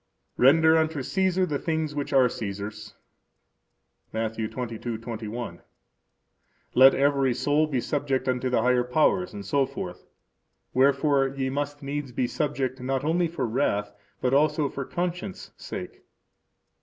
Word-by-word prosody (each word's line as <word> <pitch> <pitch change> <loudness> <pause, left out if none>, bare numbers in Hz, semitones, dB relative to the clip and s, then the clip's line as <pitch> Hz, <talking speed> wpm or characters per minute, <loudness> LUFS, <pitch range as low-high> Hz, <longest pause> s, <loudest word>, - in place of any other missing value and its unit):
Render 160 +5 +6
unto 155 -3 -1
Caesar 190 +3 +1
the 145 -5 -2
things 160 -2 -1
which 145 -1 -3
are 130 -2 +5
Caesar's. 105 -1 -6 1.2
Matt. 110 0 -2
22:21. 115 -2 -5 1.1
Let 135 +2 +7
every 135 -2 +2
soul 150 +4 +2
be 135 -4 -1
subject 135 0 -1
unto 130 0 0
the 120 -3 +1
higher 125 0 +3
powers, 125 -7 +1
etc. 130 0 -2 0.8
Wherefore 140 +1 +3
ye 135 -1 -3
must 145 +1 -3
needs 140 -1 -4
be 125 - 0
subject, 130 -1 -2
not 130 +1 -1
only 170 +3 +2
for 160 -6 -3
wrath, 110 -4 0 0.3
but 125 0 +1
also 150 0 +3
for 135 0 -5
conscience' 175 - -4
sake. - - -7
135 Hz, 125 wpm, -26 LUFS, 120-145 Hz, 1.2 s, Let